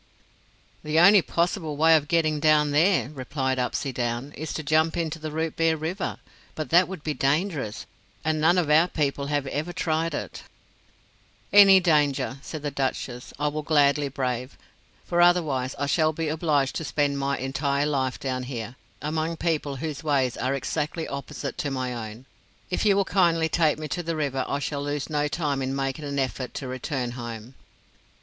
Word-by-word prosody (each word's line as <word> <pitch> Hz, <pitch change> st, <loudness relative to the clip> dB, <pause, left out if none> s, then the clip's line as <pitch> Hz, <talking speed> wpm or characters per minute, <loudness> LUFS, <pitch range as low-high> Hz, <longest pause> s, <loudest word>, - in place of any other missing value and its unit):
"The 155 Hz, +1 st, -1 dB
only 195 Hz, +3 st, +8 dB
possible 170 Hz, -3 st, -1 dB
way 160 Hz, +2 st, +6 dB
of 150 Hz, -2 st, +1 dB
getting 155 Hz, -1 st, +1 dB
down 150 Hz, -1 st, +4 dB
there," 160 Hz, 0 st, +3 dB
replied 130 Hz, -2 st, -2 dB
Upsydoun, 125 Hz, +1 st, -2 dB
"is 155 Hz, -1 st, -5 dB
to 160 Hz, -, -4 dB
jump 155 Hz, +3 st, +2 dB
into 160 Hz, -1 st, -2 dB
the 155 Hz, 0 st, -5 dB
Rootbeer 160 Hz, +1 st, 0 dB
River; 170 Hz, +5 st, -3 dB, 0.4 s
but 155 Hz, -, -5 dB
that 175 Hz, +2 st, +6 dB
would 185 Hz, -5 st, -8 dB
be 155 Hz, -, -1 dB
dangerous, 145 Hz, -, -1 dB, 0.4 s
and 155 Hz, -1 st, +1 dB
none 175 Hz, +3 st, +4 dB
of 165 Hz, -4 st, +1 dB
our 160 Hz, +3 st, +6 dB
people 140 Hz, -4 st, -1 dB
have 145 Hz, -1 st, 0 dB
ever 150 Hz, +5 st, -3 dB
tried 165 Hz, -1 st, -1 dB
it" -, -, -6 dB, 1.1 s
"Any 195 Hz, -2 st, +9 dB
danger," 145 Hz, -6 st, +1 dB
said 155 Hz, 0 st, -7 dB
the 145 Hz, -, -2 dB
Duchess, 130 Hz, -2 st, -3 dB
"I 150 Hz, +1 st, 0 dB
will 155 Hz, +1 st, -3 dB
gladly 145 Hz, -1 st, +3 dB
brave; 125 Hz, -1 st, -3 dB, 0.5 s
for 175 Hz, 0 st, +1 dB
otherwise 155 Hz, -8 st, +2 dB
I 140 Hz, -, -1 dB
shall 155 Hz, +2 st, +2 dB
be 160 Hz, 0 st, -2 dB
obliged 150 Hz, -4 st, +1 dB
to -, -, -4 dB
spend 140 Hz, 0 st, 0 dB
my 140 Hz, 0 st, 0 dB
entire 140 Hz, +2 st, -1 dB
life 135 Hz, -3 st, -1 dB
down 130 Hz, -1 st, -2 dB
here, 120 Hz, -1 st, -6 dB, 0.3 s
among 160 Hz, +2 st, -2 dB
people 155 Hz, -5 st, -1 dB
whose 150 Hz, +2 st, -5 dB
ways 135 Hz, -5 st, +1 dB
are 130 Hz, +2 st, -1 dB
exactly 150 Hz, +4 st, -3 dB
opposite 140 Hz, -1 st, -6 dB
to 145 Hz, -, -1 dB
my 125 Hz, -4 st, -3 dB
own. 115 Hz, +5 st, -12 dB, 0.5 s
If 200 Hz, -, +1 dB
you 200 Hz, -, +5 dB
will 200 Hz, 0 st, +2 dB
kindly 170 Hz, -4 st, +2 dB
take 160 Hz, -3 st, +2 dB
me 155 Hz, 0 st, -5 dB
to 175 Hz, -, -2 dB
the 165 Hz, -1 st, -3 dB
river 140 Hz, -4 st, -1 dB
I 140 Hz, -, -1 dB
shall 145 Hz, 0 st, -3 dB
lose 145 Hz, +1 st, -3 dB
no 150 Hz, -1 st, +1 dB
time 145 Hz, -3 st, -1 dB
in 135 Hz, +1 st, -2 dB
making 135 Hz, +2 st, -3 dB
an 140 Hz, 0 st, -4 dB
effort 130 Hz, -1 st, -2 dB
to 135 Hz, -, -4 dB
return 130 Hz, 0 st, -3 dB
home." 120 Hz, 0 st, -7 dB
150 Hz, 180 wpm, -25 LUFS, 135-160 Hz, 1.1 s, Any